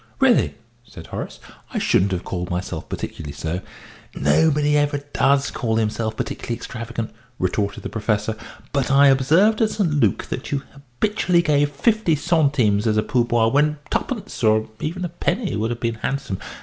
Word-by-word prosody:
"Really," 265 -3 +4 0.3
said 115 - -12
Horace, - - -6 0.3
"I - - -3
shouldn't 95 +1 +2
have 90 -1 -2
called 90 -2 -4
myself 90 -2 -4
particularly 75 -3 -5
so." 80 +5 -3 0.5
"Nobody 150 - +3
ever 145 0 +2
does 140 -1 +1
call 115 -4 -1
himself 110 0 -1
particularly 120 - -3
extravagant," 115 -1 -5 0.3
retorted 100 +3 -1
the - - -4
Professor; 105 0 -1 0.4
"but 140 -3 +1
I 140 +1 +6
observed 165 - +4
at 220 - +4
St. 200 -7 0
Luc 145 -1 +2
that 130 - -5
you 140 -1 -1
habitually 170 - 0
gave 145 -2 +3
fifty 195 +3 +2
centimes 140 -9 +2
as 110 -1 +2
a 110 - +3
pourboire 120 -1 +2
when 150 +2 +2
twopence, - - -3
or 110 0 +3
even 180 +7 -3
a - - -3
penny, 180 +5 -1
would 110 +1 -1
have 120 0 -3
been 115 -1 -1
handsome. 135 -9 -2
130 Hz, 160 wpm, -22 LUFS, 110-150 Hz, 0.5 s, I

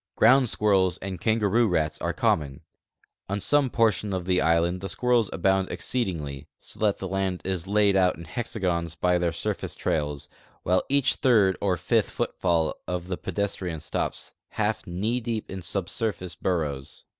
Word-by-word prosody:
Ground 130 0 +5
squirrels 95 -5 +2
and 95 -2 -6
kangaroo 110 +1 +2
rats 80 -5 0
are - - 0
common. 70 -3 0 0.7
On 100 +1 -1
some 145 +5 +3
])ortions 105 -4 +1
of 90 -2 -3
the 90 0 +2
island 85 +3 +2
the 95 - -4
squirrels 120 +2 +2
abound 95 +3 +1
exceedingl}^ 75 - -3
so - - -9
that 105 -2 +2
the 95 - -5
land 95 -1 -1
is 95 -2 -2
laid 100 -1 +3
out 90 -4 +3
in 85 - -9
hexagons 90 -6 -2
by 90 +1 +2
their 85 -1 +1
surface - - -3
trails, 75 -2 -2 0.4
while 90 +1 +2
each 140 -1 +2
third 105 -7 +4
or 95 -3 +1
fifth - - +1
footfall 85 -4 0
of 90 0 -3
the 90 - -2
pedestrian 95 -5 -3
stops - - -3
half - - -2
knee 105 +8 -1
deep 115 -2 -4
in 95 0 -5
subsurface 95 +1 -2
burrows. 75 -7 -3
95 Hz, 160 wpm, -26 LUFS, 85-105 Hz, 0.7 s, Ground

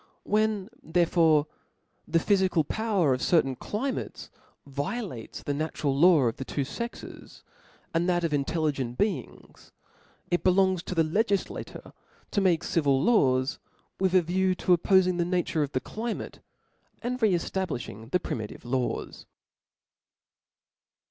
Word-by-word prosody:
When 215 -1 0
therefore 160 -3 +3 0.6
the 165 - +2
phyfical 185 -4 +2
power 205 -10 +1
of 130 - -2
certain 135 -6 +2
cli 235 - -3
mates - - -7 0.3
violates 140 - -5
the 145 - -1
natural 145 -2 -1
law 165 +1 +6
of 120 -2 0
the - - -4
two 140 +1 -2
fcxes, 235 - -8 0.5
and 170 +2 +1
that 175 -1 +1
of 165 -2 0
intelligent 140 -4 -1
beings; 210 0 -4 0.6
it 175 -2 +1
belongs 190 -1 +3
to 185 - -4
the 165 - +4
legif 200 +5 +1
latureto - - -9 0.5
make 180 -4 +2
civil 140 -5 +2
laws, 135 - +2 0.4
with 190 -1 +2
a 185 - +5
view 185 +3 +1
of - - -10
oppol^ng 185 0 +3
the - - +3
nature 175 -2 0
of 145 -1 -2
the 130 - +1
climate, 225 - -5 0.6
and 250 +1 -3
re 215 -4 +4
eflablilhing 155 - -4
the 180 - +2
primitive 110 -9 -6
laws. 125 0 -3
170 Hz, 135 wpm, -27 LUFS, 140-190 Hz, 0.6 s, law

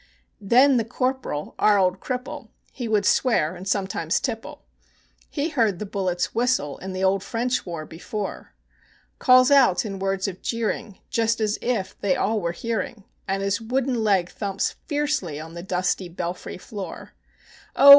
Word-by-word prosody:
Then 250 +6 +5
the 230 - +2
Corporal, 255 - -2
our 210 -1 +5
old 185 -1 +2
cripple 250 +3 -4 0.2
(he 245 -3 -5
would 210 -3 +2
swear 180 - +2
sometimes 190 -4 0
and - - -3
tipple), 230 -4 -4 0.7
He 300 +2 -1
had - - -11
heard 225 - +2
the 210 - -4
bullets 185 -3 -1
whistle 230 - +1
(in 190 0 -6
the 185 0 -2
old 190 0 +3
French 245 0 -1
war) 165 -3 -4
before, 195 +6 -6 0.6
Calls 255 0 +6
out 250 -9 +5
in 195 -2 -4
words 195 0 0
of 190 -1 -6
jeering, 230 -2 -2
just 230 -2 +2
as 215 -1 0
if 235 -6 -1
they 195 -2 +2
all 220 -1 +1
were 170 -1 0
hearing, 225 +2 -3 0.2
And 195 0 -1
his 200 +2 0
wooden 245 0 0
leg 190 -5 +3
thumps 200 -2 -1 0.2
fiercely 290 - -1
on 160 +1 -8
the 170 - -6
dusty 185 0 -1
belfry 175 +1 -5
floor: 200 +1 -8 0.6
"Oh! 280 - +8
205 Hz, 165 wpm, -24 LUFS, 185-240 Hz, 0.7 s, Oh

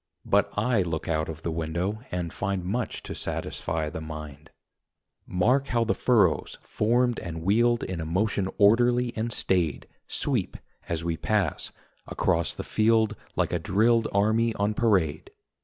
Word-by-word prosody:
But - - +3
I 110 0 +2
look 85 -2 -3
out 80 -1 0
of 80 0 -7
the 85 - -2
window 85 +6 -2
and 90 -2 -3
find 95 -1 -2
Much 115 +6 -3
to - - -6
satisfy 80 -1 -3
the 80 - -6
mind. 75 -1 -8 0.8
Mark 125 +10 +2
how 120 -1 +1
the 115 - +1
furrows, 105 -10 +2
formed 120 +2 +1
and 80 -2 -6
wheeled 120 +5 +3
In 90 -3 -4
a - - -4
motion 95 +3 0
orderly 120 +4 +4
and 115 +2 -2
staid, 85 - 0 0.2
Sweep, - - -1 0.3
as 85 -1 -2
we 85 -1 -1
pass, 100 -6 -1 0.4
across 85 -3 0
the - - -5
field 110 0 +2 0.2
Like - - 0
a - - +1
drilled 115 +4 +2
army 110 +3 +2
on 105 +1 0
parade. 95 -10 +1
100 Hz, 155 wpm, -26 LUFS, 85-115 Hz, 0.8 s, orderly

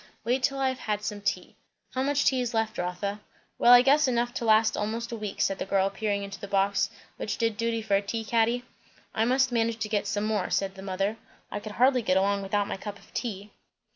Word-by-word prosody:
"Wait 245 +4 +1
till 275 +1 +1
I 270 -1 +2
have 260 - -4
had 210 -1 -2
some 210 -1 -4
tea. 200 - -2 0.4
How 260 - -1
much 285 +1 +1
tea 260 -1 +3
is 240 -1 -3
left, 225 0 -1
Rotha?" 180 +3 -3 0.4
"Well, 240 - +6
I 245 0 +9
guess, 285 +2 +4
enough 240 -1 0
to 235 - -3
last 220 0 +4
almost 230 +3 -3
a - - -3
week," 210 -3 -6
said 195 - +1
the - - -2
girl, 195 0 +2
peering 200 0 -2
into 200 -1 -7
the 200 - -7
box 200 0 +1 0.3
which - - -3
did 230 -2 0
duty 230 0 -1
for 205 -2 +1
a 195 - +3
tea 225 +2 -4
caddy. 235 +2 +1 0.5
"I 220 - +1
must 260 +2 +2
manage 230 -1 +1
to 225 -2 -3
get 205 -1 0
some 205 +1 -1
more," 215 -3 0
said 195 -1 0
the 190 - -11
mother. 195 +3 -2 0.3
"I - - -3
could 210 0 -8
hardly 255 +3 +4
get 185 -4 +2
along 200 +1 +2
without 200 +1 0
my - - -4
cup 205 +1 -7
of - - -21
tea." 205 -4 -4
215 Hz, 240 wpm, -27 LUFS, 200-240 Hz, 0.5 s, I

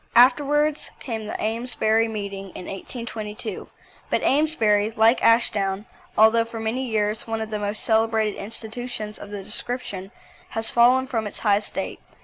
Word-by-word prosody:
Afterwards 290 +5 +4
came 225 -4 -5
the - - -4
Amesbury 225 0 +1
Meeting 200 -3 -5
in 180 - -7
1822, 215 +1 -6 0.4
but - - +1
Amesbury, 225 -9 +3
like 225 +2 +3
Ashdown, 210 -4 +3 0.3
although 220 +1 +6
for 230 0 -7
many 235 +4 -2
years 215 0 0
one 225 0 -2
of 220 0 -4
the 210 - -2
most 205 +1 -2
celebrated 220 -1 +2
institutions 220 0 -5
of 205 - -9
the 205 -1 -6
description, 200 -5 -4 0.4
has 225 0 -1
fallen 250 +2 +5
from 225 -4 -2
its 205 - -6
high 205 -2 +4
estate. 205 - -4
220 Hz, 145 wpm, -24 LUFS, 210-235 Hz, 0.4 s, although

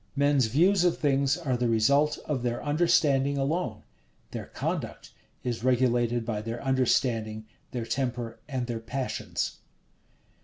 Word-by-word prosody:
Men's 140 -3 +3
views 175 - +4
of 175 -1 +2
things 140 -1 +2
are 145 -8 -1
the 120 -1 0
result 140 +7 +3
of 145 -5 -1
their 120 -1 -2
understanding 145 -3 +3
alone: 155 +7 -1 0.5
their - - -6
conduct - - -4 0.3
is 120 -2 -3
regulated 120 -2 +2
by 110 -3 -2
their 115 +2 -5
understanding, 115 -4 +1 0.2
their 120 -2 -4
temper, 120 -2 -3
and 130 -3 -2
their 120 -2 -3
passions. 125 +3 -3
130 Hz, 130 wpm, -28 LUFS, 120-140 Hz, 0.5 s, views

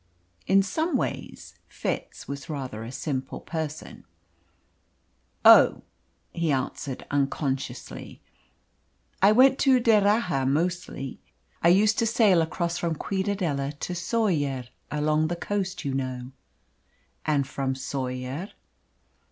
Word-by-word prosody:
In 195 0 +5
some 315 - 0
ways - - -5
Fitz - - -4
was 140 +1 -6
rather 130 -7 -5
a 115 - -7
simple 135 -1 -4
person. 160 -2 -6 1.4
"Oh!" - - +8 0.5
he 170 -2 0
answered 135 0 -3
unconsciously. 140 -1 -3 1.0
"I 200 +2 +7
went 260 +4 +5
to 265 -2 +5
D'Erraha 205 - +3
mostly. 165 -2 -2 0.4
I - - +4
used 205 +5 +4
to 230 - +2
sail 210 -6 +4
across 170 +1 -2
from 170 -2 -1
Ciudadela 180 -7 -2
to 180 - -3
Soller 175 - 0 0.3
along 150 +1 +1
the 175 - -2
coast, 190 -1 -3
you 140 - -1
know." 130 -1 -3 0.9
"And 145 -3 +1
from 135 -1 -2
Soller?" 130 +5 -4
160 Hz, 110 wpm, -26 LUFS, 135-195 Hz, 1.4 s, Oh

